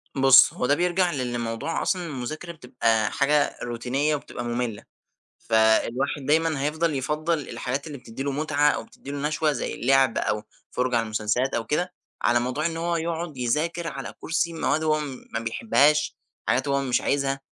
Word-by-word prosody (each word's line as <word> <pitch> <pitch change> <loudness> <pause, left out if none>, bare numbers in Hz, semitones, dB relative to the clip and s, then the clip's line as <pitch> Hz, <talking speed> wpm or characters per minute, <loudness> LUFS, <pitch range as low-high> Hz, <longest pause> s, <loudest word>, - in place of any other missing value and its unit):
بُص 135 -1 +7
هو 125 - -2
ده 145 - +3
بيرجَع 180 +1 +1
لإن 125 -4 -2
موضوع 115 +8 -2
أصلًا 180 -2 0
المذاكرة 155 +4 -5
بتبقى 115 -7 0
حاجة 145 +1 +2
روتينية 125 +5 0
وبتبقى 120 -4 -6
مملة، 120 -3 -3 0.5
فالواحد 115 +5 +2
دايمًا 155 -1 +2
هيفضَل 155 +1 0
يفضَّل 150 +4 0
الحاجات 135 +5 -3
اللي 145 - -7
بتدّي 125 +1 -7
له 140 - -1
متعة 150 0 +2
أو - - -1
بتدّي 140 - -11
له 145 +1 -1
نشوة، 155 0 +1
زي 140 - -3
اللعب 135 -1 +3
أو 105 0 -1 0.3
فُرجَة 125 -1 0
على 115 - +1
المسلسلات 110 +5 0
أو 115 - -1
كده، 180 +4 -1 0.3
على 120 0 +3
موضوع 130 +6 -2
إن 165 -1 -1
هو 170 +1 -1
يقعد 165 -2 -3
يذاكر 160 +8 -1
على 135 -3 -6
كُرسي 170 +1 -1
مواد 160 -1 0
هو 155 -1 +2 0.3
ما 115 - 0
بيحبهاش، 150 - +2 0.3
حاجات 130 +3 +1
هو 140 0 +1
مش 130 -3 +1
عايزها. 135 -1 0
140 Hz, 170 wpm, -25 LUFS, 125-155 Hz, 0.5 s, بُص